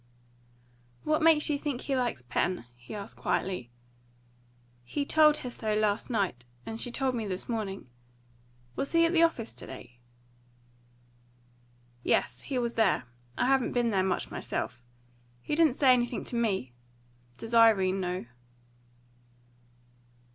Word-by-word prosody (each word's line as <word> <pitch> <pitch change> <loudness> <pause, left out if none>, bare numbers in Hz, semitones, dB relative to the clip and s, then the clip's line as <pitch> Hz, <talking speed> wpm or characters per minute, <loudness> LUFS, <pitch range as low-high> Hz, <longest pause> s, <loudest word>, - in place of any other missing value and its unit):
"What 305 +1 +1
makes 315 -2 +5
you 290 -2 0
think 285 -4 -3
he 275 - -1
likes 240 - -1
Pen?" 125 +5 -1
he 120 - -10
asked 200 -1 -6
quietly. 180 -11 -2 1.1
"He 280 - -3
told 305 0 +5
her 250 - -6
so 215 -3 -2
last 210 +2 0
night, 195 - -1 0.2
and 225 0 -3
she 245 - -2
told 265 +1 0
me 225 -3 -3
this 185 -1 -3
morning. 210 - -4 0.9
Was 275 - -3
he 335 0 +5
at 330 - +1
the 335 - +4
office 290 -9 +1
to - - -11
day?" 120 -2 -11 2.0
"Yes, - - 0
he 270 - -3
was 235 -1 0
there. 220 - +2 0.3
I - - +2
haven't 265 -1 +2
been 240 -2 +1
there 195 -2 +2
much 185 0 -1
myself. 120 +2 -4 0.6
He 120 - -5
didn't 310 -4 +4
say 265 -3 +6
anything 240 -1 0
to - - -6
me. 195 - 0 0.6
Does 225 +1 -7
Irene 200 -5 +5
know?" 180 -5 -3
230 Hz, 140 wpm, -29 LUFS, 190-270 Hz, 2.0 s, say